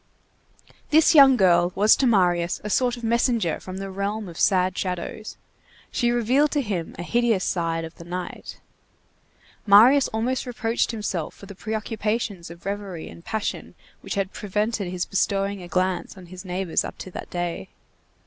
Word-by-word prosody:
This 315 +2 +5
young 275 -4 +8
girl 175 -3 +4
was 210 +2 +5
to 265 - +2
Marius 180 -5 +2
a 210 - -4
sort 245 +1 +1
of 240 - -11
messenger 230 - +1
from 185 0 -8
the 195 0 -5
realm 200 +2 -3
of 170 -1 -9
sad 185 -2 +3
shadows. 185 +4 -4 0.5
She 240 -4 +1
revealed 245 +5 +2
to 290 -2 +1
him 185 -7 -4
a - - -5
hideous 235 -2 +1
side 165 -2 -1
of 160 - -10
the 170 - -12
night. 180 +1 -7 1.1
Marius 240 +8 +7
almost 250 +4 -2
reproached 235 -1 -1
himself 205 -8 -3
for - - -13
the 200 - -10
preoccupations 215 -2 -3
of 170 0 -13
reverie 195 -4 -5
and 170 - -13
passion 220 +2 -4 0.3
which - - -5
had 195 -1 -2
prevented 210 0 -2
his 180 -1 -2
bestowing 195 0 -1
a 175 - -9
glance 185 +1 -1
on 185 - -11
his 180 +1 -10
neighbors 185 -2 -1
up - - -7
to 185 - -8
that - - -8
day. 175 - -4
200 Hz, 170 wpm, -24 LUFS, 180-225 Hz, 1.1 s, young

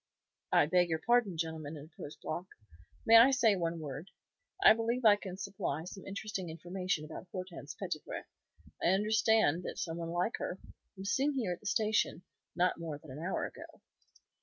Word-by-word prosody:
"I - - +6
beg 175 +2 +3
your 160 - +1
pardon, 225 -1 +2
gentlemen," 160 -2 -4
interposed 150 0 -10
Block. 175 +4 -4 0.6
"May 225 0 +9
I 235 +4 +9
say 240 -6 +4
one 170 -2 -1
word? 150 +3 -6 0.5
I - - +10
believe 230 +2 -1
I 210 -2 +9
can 190 -3 -7
supply 190 -6 -3
some 185 +2 -9
interesting 195 -2 -4
information 175 0 -3
about 160 +4 -8
Hortense 175 -6 -7
Petitpré. 180 -6 -4 0.6
I - - +2
understand 210 -2 +3
that - - -6
some 165 0 -3
one 165 -1 -4
like 175 +6 0
her 180 - -4 0.4
was 195 +2 -3
seen 280 +2 +2
here 225 -9 0
in 175 - -4
the 210 - -8
station 210 -5 +1 0.3
not 180 0 +2
more 160 -3 -4
than 145 -1 -13
an 135 - -7
hour 180 +4 -1
ago." - - -10
180 Hz, 175 wpm, -33 LUFS, 160-210 Hz, 0.6 s, I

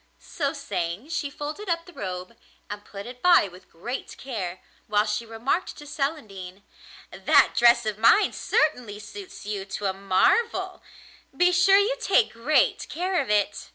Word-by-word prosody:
So 280 -4 -3
saying, 250 - -4
she 300 -3 -2
folded 300 +8 -6
up 335 0 -1
the 355 - -14
robe, 185 - -6 0.4
and 205 0 -6
put 200 -1 -9
it 250 +1 -10
by 350 - +5
with 185 0 -16
great 240 +10 -6
care, 195 -9 -5 0.3
while 210 0 +2
she 210 +2 -3
remarked 235 +11 -2
to 295 - -11
Celandine: 210 - -5 0.5
'That - - +4
dress 235 -1 +5
of 215 -1 -3
mine 230 - +5
certainly 250 -9 0
suits 375 - -10
you 205 -2 -3
to 195 +1 -6
a 190 - +1
marvel; 195 - +1 0.6
be 360 0 +4
sure 375 +2 +5
you 415 +5 +2
take 445 - +3
great 295 - +1
care 365 +1 -1
of 265 - -6
it. 205 -1 0
240 Hz, 160 wpm, -25 LUFS, 205-330 Hz, 0.6 s, by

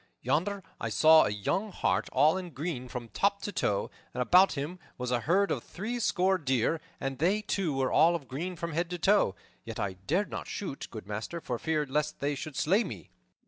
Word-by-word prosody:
Yonder 195 +5 0 0.2
I - - -2
saw 160 0 +7
a - - +1
young 145 - -1
hart 95 - 0
all 150 +5 +4
in 185 -2 -4
green 145 -4 -4
from 120 -2 -6
top 200 - +1
to 205 - -3
toe, 105 - 0 0.2
and 125 - +1
about 180 +10 +6
him 155 +5 -4 0.2
was 125 0 -3
a 125 - +2
herd 190 +10 +2
of - - -1
threescore 195 -3 0
deer, 135 +2 +1 0.2
and 135 -1 -3
they, 195 +7 +2
too, 190 -7 -1
were 135 -1 0
all 170 +2 +5
of 145 -6 -5
green 170 +8 -4
from 170 0 -4
head 170 +2 -1
to 180 - -3
foot. 190 - +3 0.3
Yet - - -7
I 100 - -1
dared 150 - -1
not - - -5
shoot, 185 -9 -5
good 110 -5 -8
master, 110 +11 -4
for 125 -7 -4
fear 155 -2 0
lest 150 +2 -1
they 145 +1 0
should 145 +1 -6
slay 195 - +3
me." 100 - -8
155 Hz, 210 wpm, -30 LUFS, 130-185 Hz, 0.3 s, saw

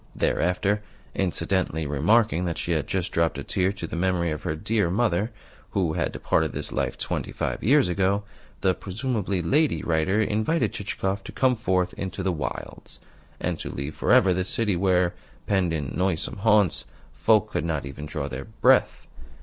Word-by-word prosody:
Thereafter, 95 +4 +1 0.3
incidentally 90 -3 0
remarking 90 - +2
that 85 -2 -2
she 85 - -3
had 80 -3 0
just 95 -2 -2
dropped 85 0 +1
a - - -4
tear 95 0 +1
to 100 - -6
the 85 - -6
memory 85 -1 +1
of 75 - -4
her 75 - -2
dear 100 +3 0
mother, 105 0 +1 0.4
who 90 -5 +1
had - - -1
departed - - 0
this - - -4
life - - -1
twenty - - -3
five - - -3
years 140 +2 +5
ago, 95 +3 +1 0.4
the 95 - +3
(presumably) 100 -1 -2
lady 150 - +2
writer 85 +5 +1
invited 110 +10 +1
Chichikov 95 -1 -3
to - - -7
come 130 -1 +2
forth 95 -5 0
into 95 0 -4
the 95 -1 +1
wilds, 75 -7 -6 0.4
and - - -2
to - - -4
leave 70 +2 -5
for - - -1
ever 95 -1 +6
the 90 +1 0
city 105 +1 0
where, 90 -1 +2 0.3
penned 95 -4 +1
in 75 -6 -3
noisome 90 0 0
haunts, 105 -2 +3 0.3
folk - - +3
could - - -1
not 80 -4 -2
even 70 +2 -7
draw 75 -2 -3
their 65 -1 -6
breath. 110 +1 +2
95 Hz, 175 wpm, -25 LUFS, 85-105 Hz, 0.4 s, ever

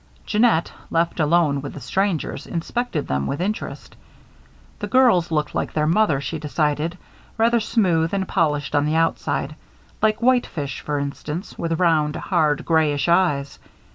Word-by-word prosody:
Jeannette, 215 -6 +2 0.2
left 170 +1 0
alone 150 -2 +2
with 145 - -7
the - - -6
strangers, 170 - -2
inspected 170 - -3
them 70 0 -1
with 140 - -3
interest. 205 +5 -4 0.8
The - - -4
girls 240 -10 +4
looked 150 -2 -1
like - - -2
their 150 -1 +1
mother, 165 -3 +2
she 160 +3 -4
decided; 150 +2 -1 0.4
rather 230 +1 +3
smooth 180 -8 +1
and 195 -2 -1
polished 150 -6 0
on 145 0 +2
the 155 - 0
outside 155 -2 0 0.5
like 215 0 +2
whitefish, 235 - 0
for 150 -1 -2
instance, 150 +5 -5
with 165 -1 -2
round, 155 -4 +2
hard 155 -6 0
grayish 155 -3 +2
eyes. 160 -6 +1
165 Hz, 145 wpm, -22 LUFS, 150-190 Hz, 0.8 s, girls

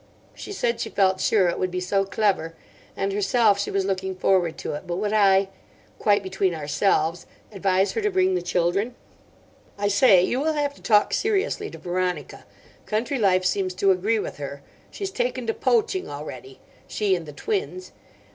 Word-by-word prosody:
She - - -9
said 235 - -1
she - - -3
felt 190 -1 +2
sure 200 -5 +3
it 170 - -1
would 185 - 0
be 180 0 -3
so 195 +2 0
clever, 195 -5 0 0.4
and, 195 0 -1
herself, 205 +1 +3
she 200 - -2
was 195 -1 0
looking 190 -1 -2
forward 185 -3 +1
to - - -4
it; 145 - -7
but 175 - -2
would 205 +3 -2
I—'quite 200 0 +1
between 190 -1 -1
ourselves'—advise 185 +4 0
her 450 - -2
to 420 - +1
bring 375 -1 +2
the 370 - 0
children. 195 +8 0 0.8
"I 205 0 0
say, 200 -3 +5
you 245 - 0
will 315 +3 0
have 290 -1 -1
to - - -19
talk 210 -2 +3
seriously 420 0 0
to - - -10
Veronica. 180 -4 -3 0.4
Country 235 +5 -1
life 185 -3 +3
seems 185 0 0
to 195 +1 +3
agree 200 +5 +1
with 210 - -4
her. 140 -1 -7 0.3
She's 390 -1 -5
taken - - -2
to 450 - 0
poaching 435 -6 0
already—she 145 - -4
and 170 -3 -6
the - - -7
twins. 395 - -3
195 Hz, 175 wpm, -24 LUFS, 180-235 Hz, 0.8 s, say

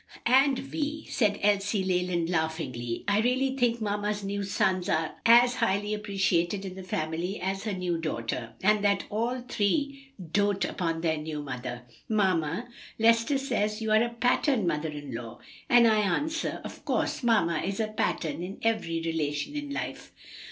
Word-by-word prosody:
"And, 265 +2 +5
Vi," 300 +3 -4
said 210 -4 +1
Elsie 200 0 +2
Leland 180 -2 0
laughingly, 160 -8 -2
"I 205 0 +3
really 260 +3 +1
think 240 -3 +1
mamma's 205 -1 -2
new 200 +1 -2
sons 190 -1 0
are 160 -1 0
as 240 +1 +7
highly 205 +2 +1
appreciated 195 -2 0
in 190 - -5
the 190 - -8
family 170 +1 -3
as 195 +2 -3
her 215 - -1
new 180 -2 -1
daughter, 115 -6 -3
and 210 +1 +3
that 200 -1 +2
all 235 +4 -1
three 275 +5 -1 0.2
doat 200 0 +2
upon 165 -2 -2
their 160 -2 +1
new 150 -1 -5
mother. 125 -2 -5 0.3
Mamma, 190 -1 +1 0.3
Lester 230 +5 +4
says 225 -5 -1
you 220 -1 -2
are 215 0 +5
a 240 - -1
pattern 245 -1 +2
mother 160 -1 -1
in 145 -3 -7
law, 115 0 -6 0.3
and 240 -1 +7
I 220 -1 +4
answer, 295 - -1
'Of - - -9
course; - - -1
mamma 205 -10 +2
is 195 +2 -3
a 220 -1 0
pattern 170 -6 -1
in 185 +3 -6
every 215 -8 0
relation 155 - -2
in 290 -1 -4
life.'" 280 - -5
200 Hz, 165 wpm, -28 LUFS, 165-230 Hz, 0.3 s, as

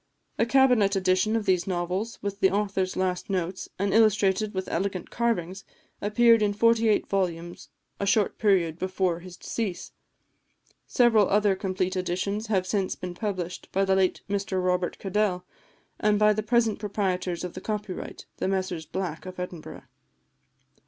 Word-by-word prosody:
A 230 - +3
cabinet 245 -6 +4
edition 185 +3 +2
of 225 -2 -1
these 180 -1 +1
novels, 185 +5 -2
with 200 0 -3
the 190 - +4
author's 195 -2 -1
last 185 0 -1
notes, 185 -1 -3
and 195 0 0
illustrated 215 -1 +3
with 190 -1 -4
elegant 185 +1 -2
engravings, 195 -5 -1 0.4
appeared 230 +2 +4
in 205 -1 +2
forty 230 +1 +3
eight 210 - +2
volumes 175 -3 -3 0.3
a 200 - -1
short 200 0 +2
period 175 -6 +2
before 185 -2 -1
his 175 0 -11
decease; 205 -7 -4 1.0
several 225 -5 +4
other 205 -1 +3
complete 185 -1 -2
editions 185 +4 -2
have 190 -4 +1
since 190 -1 -1
been 180 -1 -6
published 185 -2 -4
by 195 +1 +1
the 190 0 +2
late 190 -1 +1
Mr 200 -2 -1
Robert 180 -1 0
Cadell, 195 -2 -1 0.5
and 210 0 +3
by 210 0 +5
the 215 - -1
present 225 0 +1
proprietors 190 -4 -2
of 180 - -5
the 185 - -8
copyright, 210 -3 -5
the - - -1
Messrs 185 -4 -2
Black 185 -1 -4
of 185 0 -8
Edinburgh. 180 -3 -7
195 Hz, 155 wpm, -26 LUFS, 185-210 Hz, 1.0 s, by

